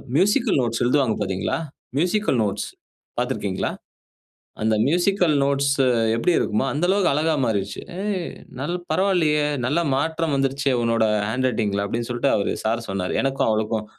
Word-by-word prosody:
Musical 205 - +3
notes 115 -2 -1
எழுதுவாங்க 125 -2 +2
பார்த்தீங்களா? 95 - -1 0.4
Musical 180 - +1
notes 100 -2 -2 0.5
பார்த்திருக்கிறீங்களா? - - -1 0.9
அந்த 110 0 +2
மியூசிக்கல் 175 0 +2
நோட்ஸ் 140 0 +1 0.4
எப்பிடி 145 +10 +2
இருக்குமோ! 110 +4 0
அந்த 150 +4 -2
அளவுக்கு 195 -1 +3
அழகா 155 +2 +1
மாறிருச்சு. 100 -3 -2 0.2
ஏய்! 200 -4 -2 0.3
நல் 150 +6 -2 0.2
பரவாயில்லயே! 165 -6 +2 0.2
நல்ல 145 +7 +1 0.2
மாற்றம் 160 +2 -1
வந்துருச்சே! 135 0 0
உன்னோட 115 -1 +2 0.2
ஹேண்ட் 130 +3 0
ரைட்டிங்ல 105 -4 0
அப்பிடின்னு 115 +3 -3
சொல்லிட்டு 120 +3 +1
அவரு 100 - 0
சார் 115 +1 0
சொன்னாரு. 95 -2 -2
எனக்கும் 135 0 0
அவளுக்கும் 110 0 0
135 Hz, 135 wpm, -23 LUFS, 115-165 Hz, 0.9 s, மியூசிக்கல்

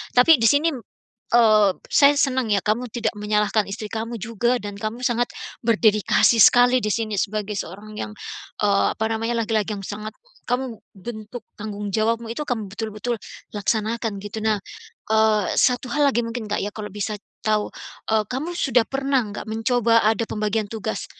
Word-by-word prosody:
Tapi 250 +4 +7
di 230 - +4
sini, 295 +4 +3 0.6
eee, 215 -4 +6 0.2
saya 285 0 +6
senang 260 -3 +1
ya, 200 - +2
kamu 220 +4 0
tidak 230 -3 0
menyalahkan 210 0 +1
istri 210 +2 -6
kamu 230 +2 -4
juga 230 +3 0
dan 205 0 -6
kamu 215 +4 -4
sangat, 240 -1 +1 0.4
berdedikasi 220 0 +4
sekali 245 +3 +6
di 210 - 0
sini 215 -3 -2
sebagai 210 0 -2
seorang 210 +4 -7
yang, - - -4 0.5
eee, 200 -1 +3
apa 220 - -2
namanya 225 +1 -1
laki-laki 220 -1 0
yang 200 - -6
sangat, 210 +2 -6 0.3
kamu, 245 -2 -2 0.2
bentuk 215 +3 -8 0.2
tanggung 205 -1 -5
jawabmu 225 +3 0
itu, 265 +6 -4
kamu 220 -7 -3
betul-betul, 220 +3 -4 0.4
laksanakan 215 0 -1
gitu. 205 +2 -7
Nah, 215 -2 +1 0.5
eee, 220 -2 +3
1 250 -1 +2
hal 290 +3 +2
lagi 240 -4 +2
mungkin 230 0 -4
Kak 210 0 -2
ya 205 - -2
kalau 210 -1 -5
bisa 210 +1 -3 0.3
tahu, 215 -1 +1 0.4
e 220 - +3
kamu 290 +7 -3
sudah 245 -7 +3
pernah 270 -1 +1
nggak 205 0 -7
mencoba 230 +1 +2
ada 220 +1 +2
pembagian 215 0 -1
tugas, 215 -2 -4
220 Hz, 165 wpm, -23 LUFS, 210-240 Hz, 0.6 s, Tapi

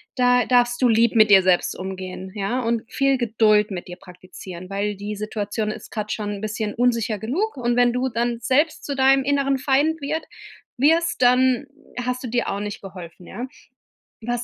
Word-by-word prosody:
da 250 -1 +3
darfst 245 0 +2
du 250 - +5
lieb 230 0 +3
mit 215 -2 +6
dir 190 -2 +7
selbst 185 -1 +1
umgehen, 190 0 -7
ja, 210 +6 -1
und 230 -1 -1
viel 275 -1 +2
Geduld 215 -3 +2
mit 180 -2 -6
dir 180 - -8
praktizieren, 185 -1 -11
weil 200 +1 -2
die 205 +2 -6
Situation 215 0 -3
ist - - -10
grad 215 -1 -4
schon 205 -2 -4
bisschen 215 0 -3
unsicher 230 -3 0
genug 310 - -2
und 240 -1 0
wenn 245 0 +4
du 250 +1 0
dann 235 0 -1
selbst 285 +7 +1
zu 285 - -3
deinem 270 0 +4
inneren 275 -1 +1
Feind 290 +5 +1
wird 305 +3 -3 0.5
wirst, 325 +5 +2
dann 255 +2 +3 0.4
hast 250 +1 -3
du - - -4
dir 240 +1 -1
auch 200 - -2
nicht 205 -1 -6
geholfen, 180 -2 -11
ja? 240 +6 -6 0.8
Was 240 +1 -2
235 Hz, 185 wpm, -22 LUFS, 205-255 Hz, 0.8 s, dir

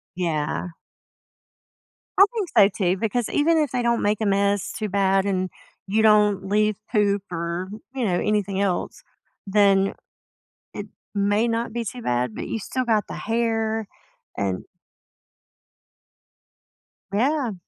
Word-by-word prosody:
Yeah. 165 -1 -2 1.5
I 395 - +9
think 420 -7 -2 0.3
so, 195 - 0
too, 190 - 0
because 225 +3 -1
even 325 +3 +3
if 300 -4 +1
they 250 - 0
don't 235 -1 +1
make 210 +1 0
a - - +1
mess 200 0 +1
too 215 -2 -4
bad, 195 0 +2
and 185 -2 0 0.4
you 215 +3 +2
don't 210 -3 +4
leave 210 +1 +2 0.2
poop 205 -3 +2
or, 170 +2 -3 0.3
you 255 -3 -1
know, 180 -3 +1
anything 200 -2 0
else, 190 -3 -2 0.4
then 195 -1 +4
it - - -8 1.2
may 205 +3 +2
not 230 0 -2
be 235 0 -2
too 245 +4 -6
bad, 125 - -1
but - - -5
you 225 - -3
still 255 +5 -3
got 220 -3 +2
the - - -6
hair 225 -1 -1 0.5
and 95 -2 -2 2.5
Yeah. 250 +3 +1
205 Hz, 135 wpm, -23 LUFS, 195-230 Hz, 2.5 s, I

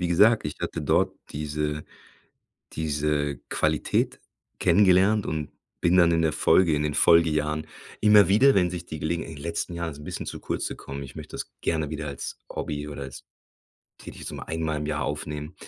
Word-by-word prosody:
Wie 90 - 0
gesagt, 105 +6 +5
ich 75 - -6
hatte - - -3
dort - - +2 0.2
diese 75 0 -3 0.9
diese 75 -2 -1
Qualität - - 0 0.4
kennengelernt 95 +3 +4
und 75 -2 -3 0.3
bin 85 +1 +4
dann 85 -2 +6
in 80 - +2
der 80 -1 +2
Folge, 90 -4 +4
in 75 - 0
den 75 -1 -1
Folgejahren, 75 -2 +3 0.3
immer 105 -1 +6
wieder, 130 +8 +6
wenn 90 -2 +3
sich 85 -1 -6
die 80 -3 -7
Gelegen 85 +2 -1
in 80 - -9
den 70 - -10
letzten 85 +1 -3
Jahren 85 -1 -3
ist 70 - -10
es - - -11
'n 75 - -11
bisschen - - -5
zu - - -5
kurz - - -3
gekommen, 70 +1 -7
ich 70 - -11
möchte - - -9
das - - -6
gerne 80 -3 0
wieder 75 -1 -4
als 70 - -6
Hobby 75 0 -4
oder 70 -1 -7
als 65 -1 -8 0.8
tätig - - -10
so - - -5
einmal 80 -1 -2
im 75 - -4
Jahr 75 -2 -1
aufnehmen. 75 +2 -4
80 Hz, 190 wpm, -26 LUFS, 75-85 Hz, 0.9 s, dann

